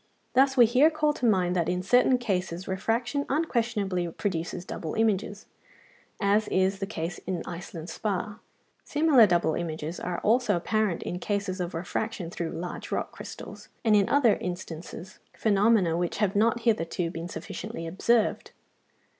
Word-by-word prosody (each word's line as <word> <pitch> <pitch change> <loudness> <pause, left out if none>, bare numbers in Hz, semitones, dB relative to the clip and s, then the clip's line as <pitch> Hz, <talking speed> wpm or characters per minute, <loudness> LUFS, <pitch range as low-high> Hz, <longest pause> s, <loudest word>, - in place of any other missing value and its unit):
Thus 265 +1 +4
we 240 - +9
here 255 +7 +5
call 305 -1 +1
to 250 - 0
mind 185 -4 +2
that 170 -2 +1
in 180 0 -1
certain 250 +5 +4
cases 190 -6 -2
refraction 235 +8 -1
unquestionably 230 - 0
produces 175 0 -3
double 160 -4 -5
images, 210 -2 0 0.7
as 205 +1 +2
is 190 +1 +1
the 195 - -3
case 170 -4 -4
in 180 -3 -2
Iceland 170 -2 -7
spar: 205 +2 -3 0.4
similar 290 -7 +5
double 170 -3 +2
images 160 0 -4
are 175 -1 -3
also 225 -1 +3
apparent 210 +1 0
in 180 - -4
cases 200 -2 -2
of 175 -1 -4
refraction 180 +1 -3
through 170 -2 -3
large 175 +2 -6
rock - - -2
crystals, - - -10 0.2
and 215 -2 +5
in 200 -2 +3
other 270 -6 +4
instances; 175 0 -7 0.2
phenomena 205 -4 +3
which 175 0 -1
have 205 -2 +1
not 230 +3 +2
hitherto 180 -6 0
been 165 +1 -5
sufficiently 175 -3 -6
observed. 215 +7 +1
195 Hz, 150 wpm, -27 LUFS, 175-225 Hz, 0.7 s, we